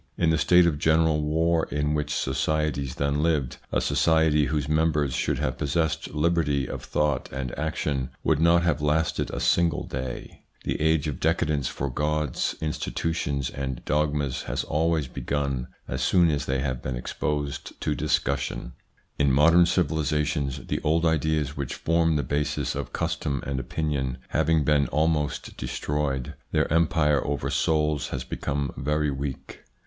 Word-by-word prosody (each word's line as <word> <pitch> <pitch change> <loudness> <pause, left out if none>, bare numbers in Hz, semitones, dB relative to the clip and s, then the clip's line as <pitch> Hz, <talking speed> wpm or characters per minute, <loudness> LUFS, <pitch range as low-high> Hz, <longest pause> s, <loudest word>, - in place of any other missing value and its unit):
In 80 -2 +3
the 80 - +2
state 90 +4 +5
of 75 -4 +1
general 80 0 +3
war 80 +2 +1
in 75 0 0
which 75 -1 -1
societies 70 -1 -1
then 70 +1 0
lived, 75 -6 0
a - - +2
society 80 -2 +3
whose 75 -1 -1
members 75 -3 +1
should - - 0
have - - -2
possessed 80 +2 -1
liberty 75 -4 +1
of - - -6
thought 75 -3 -1
and 65 -2 -4
action 75 -3 -2
would - - +2
not 85 +1 +4
have 80 -4 +1
lasted 75 +2 +1
a - - -4
single 85 -3 +2
day. 65 -1 -6 0.2
The - - -2
age 80 0 +2
of 75 - -4
decadence 75 -4 +1
for 70 - -3
gods, 75 0 -1
institu 80 +1 -2
tions, 70 -5 -2
and 65 -2 -5
dogmas 75 -2 0
has - - -1
always 80 -1 0
begun 70 0 -2 0.2
as - - -3
soon 85 -3 +4
as 75 - -2
they 65 0 0
have 65 -3 -2
been 65 - -3
exposed 70 +2 -3
to - - 0
discussion. 65 -2 -1 0.5
In 70 -1 +4
modern 85 +5 +6
civilisations, 75 -5 0
the - - -2
old 80 +2 +2
ideas 80 -2 +1
which 70 -3 -4
form 85 -1 +2
the 75 - +1
basis 75 0 -1
of - - -5
custom 70 -2 -2
and 70 -1 -2
opinion 65 -2 -2
having 80 0 +2
been 70 0 +3
almost 75 -1 0
destroyed, 70 -4 -2 0.2
their - - +2
empire 80 -3 +3
over 70 -1 -2
souls 75 -2 +1
has 65 -2 -4
become 70 +1 -3
very 75 +2 0
weak. 70 -1 -5
75 Hz, 155 wpm, -26 LUFS, 70-80 Hz, 0.5 s, modern